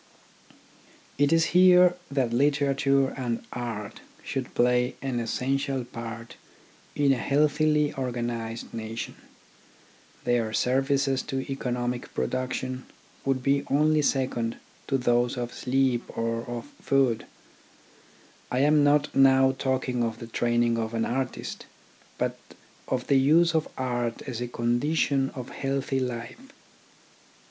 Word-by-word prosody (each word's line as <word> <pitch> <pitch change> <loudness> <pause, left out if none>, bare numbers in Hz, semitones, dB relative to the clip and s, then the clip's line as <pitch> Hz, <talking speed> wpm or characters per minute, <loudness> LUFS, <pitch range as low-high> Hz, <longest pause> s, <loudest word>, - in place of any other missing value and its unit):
It 145 0 +3
is 165 0 +4
here 180 0 +7
that 130 -4 0
literature 140 0 +2
and 120 -3 -4
art 115 -4 -5 0.2
should 130 -2 -4
play 125 +1 +2
an 130 -3 -2
essential 135 +3 -1
part 115 -1 -8 0.6
in 140 -2 +3
a - - -1
healthily 150 +2 +2
organised 120 -3 -4
nation. 115 0 -5 1.1
Their 120 -3 0
services 135 +2 +1
to 135 -2 -2
economic 125 -2 -3
production 130 0 -2 0.4
would 135 -2 0
be 140 +1 +2
only 155 +2 +3
second 130 -5 0 0.3
to 135 - +1
those 120 -1 +1
of 120 -1 -4
sleep 130 -2 +1 0.2
or 115 0 -1
of 120 -1 -5 0.2
food. 135 -5 +1 1.2
I 125 - -2
am 150 +1 +4
not 145 +1 +3
now 135 -1 +5
talking 130 -2 -1
of 115 -1 -2
the 115 - -8
training 120 0 +1
of 115 0 -3
an 115 - +1
artist, 130 0 -4 0.5
but - - -2 0.5
of 125 -1 -1
the 140 -1 +4
use 165 +5 +4
of 160 -1 +1
art 120 -2 -2
as 125 -3 -5
a 125 - -2
condition 135 +3 +1
of 125 -3 -6
healthy 135 0 -2
life. 125 - -4
130 Hz, 120 wpm, -26 LUFS, 120-140 Hz, 1.2 s, here